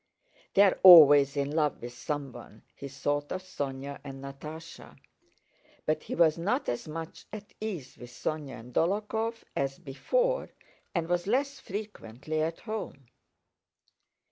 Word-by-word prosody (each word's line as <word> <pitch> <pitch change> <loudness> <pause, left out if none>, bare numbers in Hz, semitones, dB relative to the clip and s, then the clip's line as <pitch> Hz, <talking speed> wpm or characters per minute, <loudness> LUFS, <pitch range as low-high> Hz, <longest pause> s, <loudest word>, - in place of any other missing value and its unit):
"They're 200 -1 +5
always 145 -6 +9
in 140 0 0
love 150 -1 0
with 120 0 -8
someone," 125 -4 -6
he 140 - -7
thought 145 +1 -2
of 185 - -4
Sónya 140 -5 -5
and 135 -1 -9
Natásha. 150 +4 -10 0.9
But 155 0 0
he - - -5
was 165 -1 +4
not 185 +5 -1
as 120 - -3
much 165 +1 -7
at 210 -1 -9
ease 185 -12 -6
with 120 - -10
Sónya 145 +2 -5
and 120 +2 -14
Dólokhov 215 - -1
as 135 0 -1
before - - -1 0.5
and 170 -2 0
was 175 +1 -1
less 275 +5 0
frequently 155 - -5
at 160 +1 -2
home. 210 - -6
155 Hz, 135 wpm, -29 LUFS, 140-190 Hz, 0.9 s, always